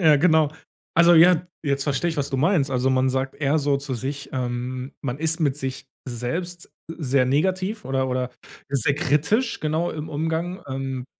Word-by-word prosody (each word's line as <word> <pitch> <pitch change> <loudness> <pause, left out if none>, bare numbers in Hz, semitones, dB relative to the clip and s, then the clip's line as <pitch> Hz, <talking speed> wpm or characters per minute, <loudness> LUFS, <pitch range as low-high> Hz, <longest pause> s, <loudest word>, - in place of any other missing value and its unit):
Ja 155 -4 +6
genau. 155 -1 +3 0.4
Also, 170 +1 +6
ja, 175 +1 +6 0.2
jetzt 140 -2 0
verstehe 150 +4 0
ich, 160 - -5
was 140 -1 -1
du 135 - -1
meinst. 150 -1 +2
Also 130 +1 +1
man 130 0 +2
sagt 135 0 -2
eher 145 +1 +1
so 145 -1 +1
zu 140 -1 -4
sich 135 +3 -5
ähm, 125 +1 -3
man 135 0 -3
ist 160 +2 0
mit 145 -3 +1
sich 135 -1 -5 0.2
selbst 165 +9 -4 0.2
sehr 140 -5 +1
negativ 190 - 0
oder 130 0 0
oder 125 0 -1 0.4
sehr 140 0 +1
kritisch 160 - +1
genau 160 +3 0
im 155 0 -6
Umgang, 165 +4 -2
ähm 130 -1 -4
145 Hz, 175 wpm, -23 LUFS, 130-165 Hz, 0.4 s, Ja